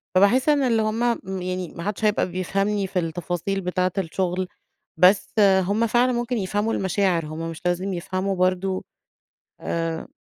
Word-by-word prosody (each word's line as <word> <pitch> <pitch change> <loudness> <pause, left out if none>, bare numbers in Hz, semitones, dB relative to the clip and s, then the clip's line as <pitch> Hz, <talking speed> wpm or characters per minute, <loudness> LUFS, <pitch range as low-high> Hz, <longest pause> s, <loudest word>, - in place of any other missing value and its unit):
فباحس 220 +10 +4
إن 290 -2 +3
اللي 230 -4 +2
هُم 215 +2 -1 0.2
يعني 185 -1 -4
ما 170 - -6
حدش 210 +2 -2
هيبقى 210 -3 +2
بيفهمني 195 +2 -1
في 185 -1 -1
التفاصيل 175 +3 -2
بتاعة 180 0 0
الشغل، 185 0 -1 0.5
بس 185 +3 +4 0.3
هُم 210 +5 +1
فعلًا 245 +3 +3
ممكن 240 0 -1
يفهموا 205 +3 -1
المشاعر، 190 -3 +1
هُم 160 +2 -5
مش 165 - -9
لازم 180 +2 0
يفهموا 185 +2 -2
برضو 185 +1 0 0.8
آآ 165 -1 -3
190 Hz, 145 wpm, -23 LUFS, 180-210 Hz, 0.8 s, فباحس